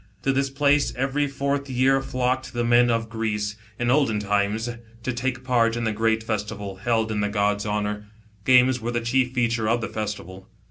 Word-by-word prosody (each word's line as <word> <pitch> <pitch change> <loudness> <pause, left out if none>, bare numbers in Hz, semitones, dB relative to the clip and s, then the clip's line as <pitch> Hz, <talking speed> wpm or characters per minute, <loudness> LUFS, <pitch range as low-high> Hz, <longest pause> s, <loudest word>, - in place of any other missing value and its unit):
To 135 - +2
this 135 +1 +1
place 145 +1 +2
every 135 +3 0
fourth 140 0 -2
year 130 +1 +3
flocked 130 -1 -1
the 120 0 -1
men 120 +1 +4
of 115 -1 0
Greece, 105 -2 -2 0.2
in 120 0 +1
olden 135 -6 +2
times, 105 +2 0 0.4
to 130 - -1
take 125 +1 -2
part 115 -3 +2
in 120 - -2
the 110 - +1
great 110 +1 +1
festival, 105 -3 -4
held 110 +1 0
in 105 - -1
the 105 - 0
god's 105 0 0
honour. 105 0 -2 0.4
Games 125 +1 +5
were 115 - -3
the 120 -1 -1
chief 125 +2 +1
feature 115 -2 +1
of 120 +1 +2
the 110 - -4
festival. 100 -3 -6
115 Hz, 190 wpm, -24 LUFS, 105-130 Hz, 0.4 s, Games